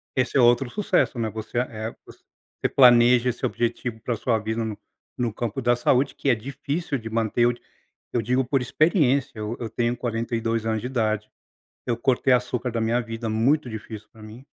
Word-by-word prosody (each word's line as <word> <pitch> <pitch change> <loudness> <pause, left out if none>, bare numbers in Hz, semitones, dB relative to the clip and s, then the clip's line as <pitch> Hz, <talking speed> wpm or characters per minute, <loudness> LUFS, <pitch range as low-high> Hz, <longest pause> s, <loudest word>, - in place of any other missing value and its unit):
Esse 130 +1 +1
é - - +5
outro 120 +1 +4
sucesso, 195 - 0
né, 115 - -1
você 110 +2 -6
a - - +3
eh, 110 0 -5
voc - - -16 0.6
você - - +1
planeja 120 -1 +6
esse 125 +2 -3
objetivo 120 -1 -2
pra 115 +1 -2
sua 115 0 0
vida 110 +2 -2
no 110 -2 -4 0.4
no 120 -3 0
campo 120 +3 -3
da 120 0 +3
saúde 130 +3 +1
que - - -5
é - - +6
difícil 140 +6 -3
de 115 -2 -8
manter. 115 0 0
Eu 120 - +5
d 120 - -16 0.5
eu 120 - +1
digo 125 +4 +1
por 135 +2 0
experiência. 140 - +1
Eu 105 +2 -4
eu 115 - -3
tenho 120 0 0
42 115 -1 -2
anos 110 -1 0
de 120 - -5
idade. 110 -4 -1 0.6
Eu 120 - 0
cortei 130 +2 +2
açúcar 125 0 0
da 115 0 -2
minha 115 +2 +1
vida, 115 0 -5
muito 125 +6 +1
difícil 110 -1 -8
pra 110 - -16
mim. 115 +5 -12
120 Hz, 200 wpm, -24 LUFS, 110-125 Hz, 0.6 s, planeja